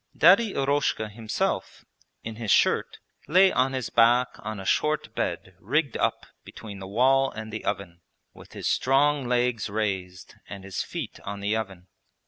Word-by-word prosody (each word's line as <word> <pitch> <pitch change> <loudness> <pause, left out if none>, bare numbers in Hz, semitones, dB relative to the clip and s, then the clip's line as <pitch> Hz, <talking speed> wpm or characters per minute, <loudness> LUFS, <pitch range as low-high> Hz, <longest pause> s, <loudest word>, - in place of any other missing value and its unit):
Daddy 225 -4 +5
Eroshka 140 -5 0
himself, 110 0 -3 0.4
in 110 -1 -6
his 115 -3 -5
shirt, - - +2 0.3
lay 185 +4 +5
on 130 +1 +1
his 130 -3 -3
back 120 +2 +4
on 110 -1 -6
a 95 - -8
short 150 +8 0
bed - - -3
rigged 140 +5 0
up - - -1 0.2
between 100 -3 -10
the 95 - -8
wall 135 +6 +3
and 110 0 -8
the 110 - -5
oven, 95 -4 -4 0.3
with - - -15
his - - -4
strong 140 0 +2
legs 120 -3 0
raised 95 -4 -3 0.2
and 100 -2 -8
his 95 -1 -4
feet - - -6
on 100 0 -6
the 100 +2 -1
oven. 95 -5 -5
110 Hz, 160 wpm, -26 LUFS, 100-135 Hz, 0.4 s, Daddy